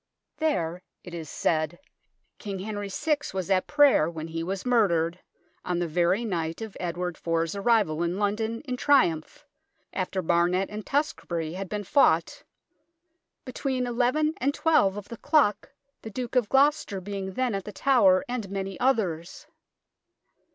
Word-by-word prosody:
There, 180 - -1 0.2
it 180 - -10
is 160 -3 -6
said, 155 +1 0 0.6
King 200 -2 -5
Henry 205 +1 -5
VI 300 +10 0 0.2
was 190 0 -2
at 185 -1 +2
prayer 285 - +5
when 165 -1 -6
he 165 0 -4
was 190 +5 -4
murdered, 180 -8 +2 0.4
on 180 -1 -1
the 175 0 -1
very 175 +7 +1
night 165 -5 -2
of 220 -3 -7
Edward 180 0 -3
IV's 165 -1 0
arrival 200 -6 +2
in 170 +2 -1
London 220 +3 -1
in 255 -4 -4
triumph, 255 - +2 0.5
after 185 0 -2
Barnet 175 +4 +2
and 210 0 -5
Tewkesbury 170 - -1
had 190 0 -5
been 210 -1 -3
fought, 275 +8 +3 0.5
" 335 0 -53
between 255 0 -2
xi - - -3 0.5
and 280 +3 +1
xii 325 - 0
of 200 -5 +2
the 235 - -8
clock, 285 -9 +2 0.3
the 225 - -7
Duke 245 +3 -5
of 240 -5 +2
Gloucester 275 -7 +2
being 190 0 -5
then 255 +1 0
at 195 -1 -3
The 210 - -6
Tower, 200 -8 +4
and 240 -5 -4
many 195 -1 -4
others." 185 -10 0
195 Hz, 155 wpm, -27 LUFS, 175-245 Hz, 0.6 s, prayer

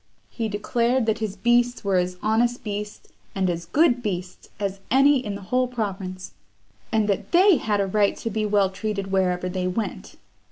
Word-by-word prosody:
He 225 -2 -3
declared 235 +4 0
that 220 0 0
his 215 -3 -3
beasts 240 +4 +2
were 195 -2 +1
as 180 0 -1
honest 235 +3 +1
beasts, 210 0 -6 0.2
and 190 -2 +1
as 170 0 -5
good 275 - +3
beasts, 180 -4 -5
as 200 -1 -3
any 275 +1 +4
in 205 -3 -4
the 200 - -8
whole 255 0 +3
province; 195 -6 -5 0.6
and 220 -2 +2
that 200 -2 -2
they 370 0 +6
had 210 -4 -1
a 200 - +2
right 200 +1 +1
to 230 - -4
be 215 +1 -1
well 205 -2 +2
treated 200 -1 -4
wherever 185 -1 +1
they 180 0 -2
went. 205 +4 -4
210 Hz, 185 wpm, -24 LUFS, 190-235 Hz, 0.6 s, they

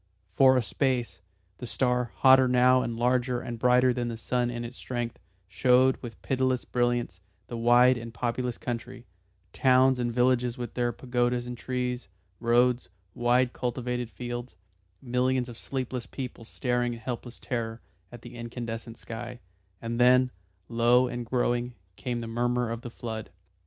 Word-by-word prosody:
For 130 +4 +6
a 125 - +2
space 125 0 -1 0.4
the 125 - -6
star, 125 -1 0
hotter 130 -1 +6
now 125 +1 +5
and 115 -2 -3
larger 125 +1 +1
and 120 -1 -6
brighter 125 +1 +4
than 120 -1 -2
the 115 -1 -4
sun 120 +1 0
in 120 0 -4
its 120 +2 -8
strength, 120 -2 -4 0.3
showed 125 +5 +4
with 115 -4 -8
pitiless 130 -1 0
brilliance 120 -6 0 0.3
the 120 - -7
wide 120 +2 +5
and 115 0 -8
populous 120 +2 -2
country; 120 +1 -6 0.5
towns 130 0 +4
and 120 -1 0
villages 125 0 +2
with 120 -1 -5
their 120 -1 0
pagodas 120 0 -1
and 125 0 -5
trees, 125 0 -3 0.3
roads, 120 -2 +2 0.2
wide 120 +2 +2
cultivated 125 -1 -3
fields, 120 -2 -6 0.5
millions 125 0 +1
of 120 - -9
sleepless 130 0 -4
people 125 -4 -7
staring 120 0 -1
in 115 - -8
helpless 120 +1 -6
terror 115 -2 -3 0.3
at 120 -1 -11
the 120 - -10
incandescent 115 -1 -6
sky; 120 +2 -7 0.4
and 115 +1 -3
then, 125 +1 +5 0.4
low 120 +2 +4
and 120 -1 -5
growing, 120 0 0 0.2
came 120 +1 -3
the 115 - -5
murmur 120 +1 0
of 115 0 -4
the 120 - -7
flood. 110 -2 -6
120 Hz, 155 wpm, -28 LUFS, 120-125 Hz, 0.5 s, For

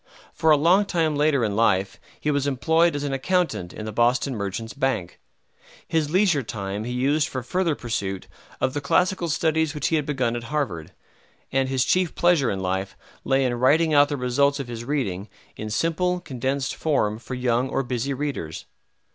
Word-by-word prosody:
For 160 0 +1
a 155 - +7
long 180 +7 +4
time 165 -5 0
later 145 -3 +2
in 105 -2 -2
life 100 -3 +1 0.2
he 150 - 0
was 145 -1 0
employed 160 +5 +2
as 145 - -3
an 140 -1 -2
accountant 150 - 0
in 110 - -7
the 110 - -4
Boston 120 +4 +1
Merchants' 105 +2 -4
Bank. 130 -10 -2 0.7
His 160 -3 0
leisure 180 -4 +3
time 105 -2 -5
he 120 - -4
used 140 +5 +1
for 130 -2 -5
further 170 +4 0
pursuit 100 -6 -4 0.3
of 130 - 0
the 145 - -2
classical 180 +4 +1
studies 160 0 +1
which 150 - -1
he 160 - +2
had 150 - -2
begun 130 -5 0
at 120 -1 -5
Harvard, 115 - -3 0.6
and 135 -1 +1
his 130 -1 +1
chief 180 -2 +1
pleasure 175 -7 +3
in 95 -1 -2
life 95 +1 -2 0.3
lay 135 0 +2
in 125 - 0
writing 150 +7 +3
out 145 0 +5
the 145 - -2
results 140 +3 +1
of 135 - -4
his 120 -1 -6
reading, 110 -8 -2 0.3
in 110 - -6
simple, 175 +9 0
condensed 135 -3 -2
form 110 -9 0
for 130 +2 -6
young 125 +1 0
or 135 - -1
busy 125 +2 -2
readers. 135 - -4
135 Hz, 190 wpm, -24 LUFS, 115-155 Hz, 0.7 s, a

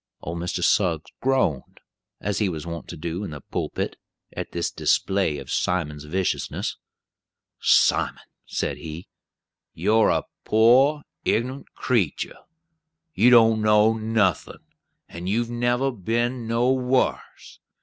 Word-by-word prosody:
Old 85 +1 -5
Mr. 90 +1 -3
Suggs - - +1
groaned, 130 - 0 0.4
as 100 +1 -2
he 105 -3 +1
was 80 -2 -5
wont 85 0 -6
to 85 - -8
do 85 +5 -4
in 100 - -5
the 75 -3 -8
pulpit, - - -3 0.4
at - - -5
this 85 -1 -2
display 95 -6 +1
of 70 -3 -8
Simon's 75 -5 -1
viciousness. 95 +4 -2 0.8
"Simon," - - +3 0.2
said - - -2
he, 80 +2 -8 0.7
"you're 110 +1 +3
a - - +1 0.2
poor 130 +7 +4 0.2
ignunt 130 +5 -1
creetur. 115 - -1 0.8
You 120 - +5
don't 115 -2 +6
know 105 +1 +4
nothin', 110 -6 -1 0.4
and 85 +2 -6
you've 115 +3 0
never 120 +3 +1
been 120 +3 -2
nowhars. 125 +2 0
110 Hz, 120 wpm, -24 LUFS, 85-120 Hz, 0.8 s, don't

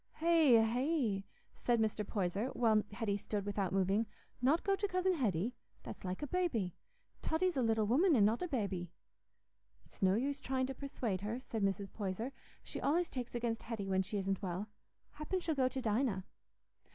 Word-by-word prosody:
"Hey, 320 -7 +5
hey," 240 -4 0 0.3
said 240 -1 +1
Mr. 215 -1 +1
Poyser, 200 +2 -1
while 220 -3 +4
Hetty 205 -1 -1
stood 205 0 -3
without 200 -3 -1
moving, 195 +4 +2 0.3
"not 280 +7 +3
go 395 -1 +3
to 405 +1 -1
Cousin 370 0 +1
Hetty? 225 - 0 0.3
That's - - -8
like 185 +7 -3
a - - -2
babby. 260 - 0 0.5
Totty's 360 +3 +1
a 265 - +2
little 225 -2 +2
woman, 300 - +4
an' 210 -5 +6
not 220 +3 +2
a 360 - -1
babby." 200 - -2 1.0
"It's - - -19
no 190 0 +4
use 275 +5 -1
trying 260 0 0
to 270 - -4
persuade 245 -8 -3
her," 215 +4 -3
said 230 -4 -4
Mrs. 195 0 -1
Poyser. 210 +5 -3 0.3
"She - - -5
allays 335 +5 +1
takes 250 -2 -4
against 230 -2 -1
Hetty 220 -4 -4
when 190 0 +2
she 195 +2 -3
isn't 195 0 -1
well. 190 +2 -3 0.4
Happen 305 +5 -2
she'll 330 -2 -1
go 265 -3 +2
to 260 0 -3
Dinah." 215 -4 +1
225 Hz, 180 wpm, -35 LUFS, 200-275 Hz, 1.0 s, an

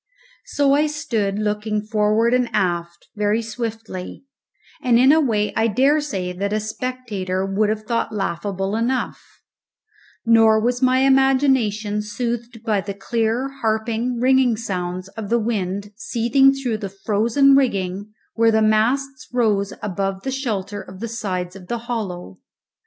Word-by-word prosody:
So 280 -1 +2
I 300 +2 +3
stood 225 -10 -2
looking 210 0 -1
forward 215 +2 +2
and 250 -1 +2
aft, 175 -3 -2
very 210 +2 +1
swiftly, 225 -2 -6 0.6
and 245 -2 +3
in 260 +3 +6
a 315 +1 +5
way 215 -6 0
I 225 - +2
dare 270 +7 +3
say 190 -11 -3
that 200 +3 -3
a 215 - +1
spectator 215 -5 -3
would 200 +2 +1
have 215 0 -2
thought 230 +1 -1
laughable 195 0 -2
enough; 240 +3 -1 1.0
nor 225 -1 +5
was 245 +3 0
my 255 0 +3
imagination 265 -6 +2
soothed 235 +1 -4
by 210 -3 +1
the 200 0 -6
clear, 230 +5 -1
harping, 225 +2 -1
ringing 255 -2 +3
sounds 185 -4 -4
of 210 0 -7
the 235 - +3
wind 205 -3 -2
seething 240 +4 +3
through 265 -5 -2
the 200 -3 -4 0.2
frozen 235 +6 +4
rigging 200 -6 0 0.2
where 230 0 +3
the 220 -1 +3
masts 255 +5 +1
rose 215 -5 +1
above 195 -1 -2
the 265 - -2
shelter 205 -7 -3
of 185 0 -12
the 230 - -4
sides 190 -5 -4
of 185 -2 -12
the 240 - -2
hollow. 205 - -5
220 Hz, 145 wpm, -21 LUFS, 200-245 Hz, 1.0 s, in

